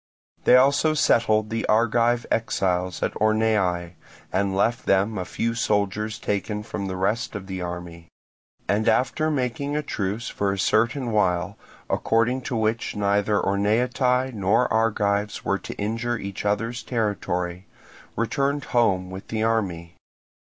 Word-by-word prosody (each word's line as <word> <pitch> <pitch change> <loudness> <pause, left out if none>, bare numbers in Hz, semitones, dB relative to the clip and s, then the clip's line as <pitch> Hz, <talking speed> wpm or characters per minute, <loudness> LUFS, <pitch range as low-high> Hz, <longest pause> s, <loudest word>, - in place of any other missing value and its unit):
They - - +7
also 140 +4 +4
settled 110 -6 +2
the 115 0 -1
Argive 115 +2 +2
exiles 90 -5 0
at - - 0
Orneae, 105 -6 +1 0.4
and 95 0 +1
left 120 +5 0
them 100 +2 +2
a 90 - -3
few 115 +6 -2
soldiers 105 -1 0
taken 105 +1 -2
from 105 -3 -5
the 95 - -4
rest 105 +5 -1
of 100 -1 -5
the 95 -1 -5
army; 85 -1 -7 0.6
and 105 +2 +2
after 130 +5 +1
making 140 0 -2
a 150 - -1
truce 105 -1 -3
for 100 -1 -1
a 100 - -2
certain 115 +6 +1
while, 90 -5 +1 0.3
according 120 +3 +1
to 125 - -2
which 110 +1 -1
neither 100 0 +1
Orneatae 125 +6 +1
nor 105 +4 +2
Argives 105 -2 0
were 100 - +1
to - - -8
injure 115 +3 -2
each 100 -1 -6
other's 115 +4 -1
territory, 90 -6 -2 0.5
returned 140 +4 0
home 95 -6 +2
with 95 +1 -8
the 110 -1 -2
army. 90 -7 -1
110 Hz, 140 wpm, -24 LUFS, 100-115 Hz, 0.6 s, They